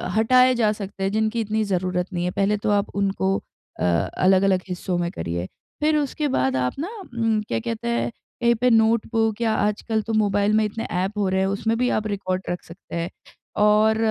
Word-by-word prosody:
हटाए 255 Hz, +3 st, +5 dB
जा 220 Hz, -3 st, +2 dB
सकते 200 Hz, -2 st, -6 dB
हैं 195 Hz, -, 0 dB
जिनकी 220 Hz, +2 st, 0 dB
इतनी 215 Hz, 0 st, 0 dB
ज़रूरत 180 Hz, -2 st, -1 dB
नहीं 175 Hz, 0 st, -1 dB
है, 180 Hz, -, -1 dB
पहले 200 Hz, +2 st, +1 dB
तो 205 Hz, -, -2 dB
आप 205 Hz, 0 st, +1 dB
उनको 195 Hz, -1 st, +1 dB, 0.4 s
अ, -, -, -2 dB
अलग-अलग 185 Hz, -, +2 dB
हिस्सों 180 Hz, 0 st, -3 dB
में 175 Hz, 0 st, -1 dB
करिए। 85 Hz, +2 st, -4 dB, 0.3 s
फिर 305 Hz, 0 st, +3 dB
उसके 295 Hz, +1 st, -1 dB
बाद 130 Hz, -, +1 dB
आप 125 Hz, -1 st, 0 dB
ना 330 Hz, +6 st, -3 dB, 0.2 s
उम, 225 Hz, -2 st, +1 dB
क्या -, -, -1 dB
कहते 230 Hz, 0 st, -4 dB
हैं? 235 Hz, 0 st, 0 dB, 0.3 s
कहीं 235 Hz, 0 st, +4 dB
पे 250 Hz, +3 st, +2 dB
नोटबुक 225 Hz, -1 st, +2 dB
या 225 Hz, -2 st, +2 dB
आजकल 215 Hz, +1 st, 0 dB
तो 225 Hz, +1 st, -4 dB
मोबाइल 205 Hz, -1 st, +2 dB
में 220 Hz, 0 st, +4 dB
इतने 220 Hz, +2 st, -4 dB
ऐप 190 Hz, +4 st, -1 dB
हो 205 Hz, -2 st, +1 dB
रहे 190 Hz, 0 st, +1 dB
हैं, 190 Hz, -, +2 dB
उसमें 210 Hz, +3 st, 0 dB
भी 250 Hz, +1 st, +1 dB
आप 215 Hz, 0 st, 0 dB
रिकॉर्ड 185 Hz, -2 st, -2 dB
रख 175 Hz, -1 st, -3 dB
सकते 170 Hz, +2 st, -11 dB
हैं। 170 Hz, +1 st, -2 dB, 0.5 s
और 215 Hz, +1 st, +4 dB
210 Hz, 205 wpm, -23 LUFS, 185-225 Hz, 0.5 s, हटाए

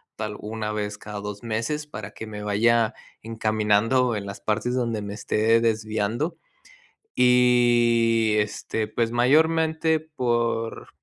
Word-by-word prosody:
tal 105 Hz, -1 st, -5 dB
1 105 Hz, 0 st, -4 dB
vez 105 Hz, -1 st, -4 dB
cada 105 Hz, -1 st, -7 dB
2 105 Hz, 0 st, -6 dB
meses 120 Hz, +7 st, -3 dB
para 105 Hz, -7 st, -8 dB
que 110 Hz, -, -9 dB
me 105 Hz, -1 st, -7 dB
vaya 115 Hz, +2 st, +2 dB, 0.3 s
encaminando 110 Hz, +2 st, +1 dB
en 100 Hz, -1 st, -5 dB
las 100 Hz, -, -7 dB
partes 110 Hz, +3 st, -1 dB
donde 115 Hz, -4 st, -1 dB
me 100 Hz, 0 st, -6 dB
esté 110 Hz, +2 st, +2 dB
desviando. 110 Hz, -, -1 dB, 0.8 s
Y, 120 Hz, -2 st, +4 dB
este, 105 Hz, +1 st, -2 dB
pues, 115 Hz, +1 st, -1 dB
mayormente 160 Hz, +5 st, +2 dB
por 120 Hz, -6 st, -2 dB
115 Hz, 125 wpm, -24 LUFS, 105-125 Hz, 0.8 s, Y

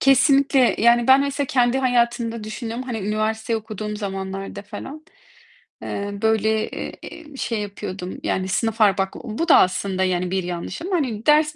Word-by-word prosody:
Kesinlikle. 275 Hz, -1 st, +4 dB
Yani, 235 Hz, +1 st, +4 dB
ben 265 Hz, +1 st, +8 dB
mesela 280 Hz, 0 st, -1 dB
kendi 250 Hz, 0 st, +2 dB
hayatımda 235 Hz, -3 st, 0 dB
düşünüyorum, 230 Hz, +2 st, -5 dB
hani, 240 Hz, -3 st, -4 dB
üniversiteyi 215 Hz, +2 st, -1 dB
okuduğum 215 Hz, -1 st, -5 dB
zamanlarda 195 Hz, -1 st, -5 dB
falan. 285 Hz, +9 st, -9 dB, 0.8 s
Eee, 200 Hz, 0 st, -4 dB
böyle, 220 Hz, 0 st, +1 dB
ııı, -, -, -5 dB, 0.4 s
ııı, 280 Hz, -, -12 dB
şey 230 Hz, -4 st, -2 dB
yapıyordum, 195 Hz, -2 st, -6 dB
yani, 185 Hz, 0 st, -1 dB
sınıf 225 Hz, +4 st, -1 dB
ar 205 Hz, -2 st, +5 dB
bak 195 Hz, 0 st, -1 dB
bu 250 Hz, +8 st, -3 dB
da 325 Hz, -, +7 dB
aslında, 185 Hz, +1 st, +2 dB
yani, 180 Hz, -1 st, 0 dB
bir 190 Hz, -1 st, 0 dB
yanlış 175 Hz, -, -5 dB
ama, 370 Hz, +1 st, -1 dB
hani, 235 Hz, -8 st, -2 dB
ders 305 Hz, 0 st, +4 dB
220 Hz, 160 wpm, -22 LUFS, 200-255 Hz, 0.8 s, ben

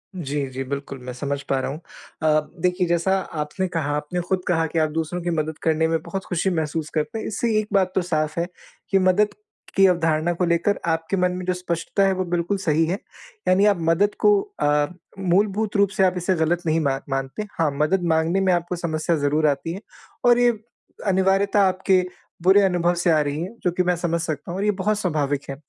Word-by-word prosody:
जी, 145 Hz, -5 st, -2 dB
जी। 130 Hz, +1 st, -4 dB
बिल्कुल, 140 Hz, 0 st, -5 dB
मैं 125 Hz, 0 st, -6 dB
समझ 140 Hz, +2 st, -3 dB
पा 135 Hz, -1 st, +2 dB
रहा 135 Hz, -, -3 dB
हूँ। 150 Hz, -, -6 dB, 0.4 s
अ, 155 Hz, -1 st, +4 dB, 0.2 s
देखिए 180 Hz, 0 st, +1 dB
जैसा 175 Hz, +3 st, +2 dB, 0.2 s
आपने 150 Hz, +6 st, -2 dB
कहा 165 Hz, -5 st, -2 dB
आपने 150 Hz, +4 st, -3 dB
खुद 190 Hz, -1 st, +1 dB
कहा 165 Hz, -2 st, +2 dB
कि 165 Hz, -, -1 dB
आप 155 Hz, -1 st, +2 dB
दूसरों 165 Hz, +3 st, -3 dB
की 175 Hz, -, -2 dB
मदद 160 Hz, -2 st, -2 dB
करने 160 Hz, 0 st, +2 dB
में 165 Hz, 0 st, +1 dB
बहुत 190 Hz, +3 st, -5 dB
खुशी 180 Hz, +2 st, 0 dB
महसूस 160 Hz, -2 st, -2 dB
करते 190 Hz, +9 st, -1 dB
हैं, -, -, -5 dB
इससे 230 Hz, +2 st, -1 dB
एक 215 Hz, -, -3 dB
बात 190 Hz, -2 st, +3 dB
तो 190 Hz, -, +3 dB
साफ़ 155 Hz, -2 st, -1 dB
है 170 Hz, -, 0 dB, 0.4 s
कि 195 Hz, -, +4 dB
मदद 185 Hz, +3 st, +3 dB, 0.4 s
की 195 Hz, 0 st, +6 dB
अवधारणा 165 Hz, -1 st, +1 dB
को 180 Hz, +1 st, 0 dB
लेकर 170 Hz, +4 st, +1 dB
आपके 165 Hz, +4 st, -2 dB
मन 180 Hz, 0 st, +2 dB
में 180 Hz, -, -5 dB
जो 185 Hz, -, +1 dB
स्पष्टता 180 Hz, +2 st, -1 dB
है 195 Hz, -, +3 dB
वो 185 Hz, 0 st, -1 dB
बिल्कुल 175 Hz, +3 st, -1 dB
सही 160 Hz, -3 st, +1 dB
है 180 Hz, +4 st, -1 dB, 0.5 s
यानी 190 Hz, +2 st, +4 dB
आप 205 Hz, -2 st, +4 dB
मदद 200 Hz, +5 st, +2 dB
को 420 Hz, -, +5 dB, 0.3 s
अ, 145 Hz, 0 st, +3 dB, 0.3 s
मूलभूत 200 Hz, +3 st, +1 dB
रूप 200 Hz, -1 st, +4 dB
से 190 Hz, -, +4 dB
आप 185 Hz, -1 st, +4 dB
इसे 180 Hz, +1 st, 0 dB
गलत 170 Hz, +2 st, +1 dB
नहीं 160 Hz, 0 st, +2 dB
मा 145 Hz, -3 st, +1 dB
मान 135 Hz, +1 st, -3 dB
मानते। 135 Hz, +8 st, -3 dB, 0.2 s
हाँ 160 Hz, -, +3 dB
मदद 155 Hz, +6 st, +1 dB
माँगने 160 Hz, +4 st, +1 dB
में 190 Hz, -1 st, +3 dB
आपको 175 Hz, +1 st, -1 dB
समस्या 170 Hz, -1 st, -1 dB
ज़रूर 150 Hz, +1 st, +1 dB
आती 145 Hz, +4 st, -1 dB
है 195 Hz, -, -7 dB, 0.4 s
और 240 Hz, 0 st, +6 dB
ये 245 Hz, 0 st, +5 dB, 0.6 s
अनिवार्यता 195 Hz, +2 st, +3 dB
आपके 185 Hz, 0 st, +2 dB, 0.4 s
बुरे 190 Hz, +3 st, +6 dB
अनुभव 175 Hz, -2 st, +2 dB
से 175 Hz, 0 st, +1 dB
आ 155 Hz, -, +4 dB
रही 145 Hz, +1 st, -2 dB
है, 190 Hz, +7 st, -6 dB
जो 180 Hz, -, +2 dB
कि 180 Hz, +1 st, 0 dB
मैं 180 Hz, 0 st, +1 dB
समझ 170 Hz, 0 st, -1 dB
सकता 155 Hz, -1 st, -4 dB
हूँ 180 Hz, -, -4 dB
और 205 Hz, -, 0 dB
ये 210 Hz, -, +4 dB
बहुत 210 Hz, +2 st, +1 dB
स्वाभाविक 145 Hz, -6 st, 0 dB
है, 135 Hz, -, -3 dB
170 Hz, 220 wpm, -23 LUFS, 155-190 Hz, 0.6 s, की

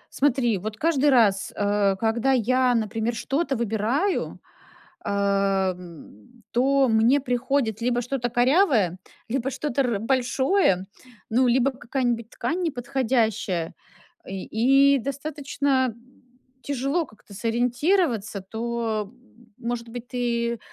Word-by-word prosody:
Смотри, 250 Hz, -6 st, +2 dB
вот, 215 Hz, +3 st, -5 dB
каждый 295 Hz, -1 st, +2 dB
раз, 215 Hz, -7 st, +3 dB
э, 205 Hz, -1 st, +1 dB
когда 230 Hz, +5 st, +1 dB
я, 255 Hz, +1 st, +2 dB
например, 225 Hz, +1 st, -1 dB
что-то 275 Hz, +4 st, -1 dB
выбираю, 235 Hz, -, -1 dB, 0.6 s
э, -, -, -3 dB, 0.6 s
м, 170 Hz, -, -13 dB
то 270 Hz, +2 st, +3 dB
мне 230 Hz, +5 st, +4 dB
приходит 250 Hz, -3 st, -1 dB
либо 245 Hz, 0 st, +1 dB
что-то 245 Hz, 0 st, -2 dB
корявое, 245 Hz, -, +3 dB, 0.3 s
либо 265 Hz, +2 st, -1 dB
что-то 280 Hz, -1 st, -1 dB
р 235 Hz, -6 st, -1 dB
большое, 260 Hz, -, +1 dB, 0.4 s
ну, 250 Hz, +3 st, +3 dB
либо 250 Hz, +2 st, +3 dB
какая-нибудь 245 Hz, -3 st, -2 dB
ткань 320 Hz, +10 st, -3 dB
неподходящая, 235 Hz, -, -1 dB, 0.5 s
и 190 Hz, -1 st, -6 dB, 0.5 s
и -, -, +1 dB
достаточно 275 Hz, -1 st, -1 dB, 0.7 s
тяжело 280 Hz, +5 st, -1 dB
как-то 215 Hz, -3 st, -19 dB
сориентироваться, 240 Hz, -, 0 dB
то, 225 Hz, +1 st, -2 dB
м. 250 Hz, -2 st, -27 dB, 0.2 s
Может 235 Hz, 0 st, -4 dB
быть, 240 Hz, +1 st, -8 dB
ты, 235 Hz, -2 st, -1 dB
240 Hz, 110 wpm, -24 LUFS, 220-270 Hz, 0.7 s, мне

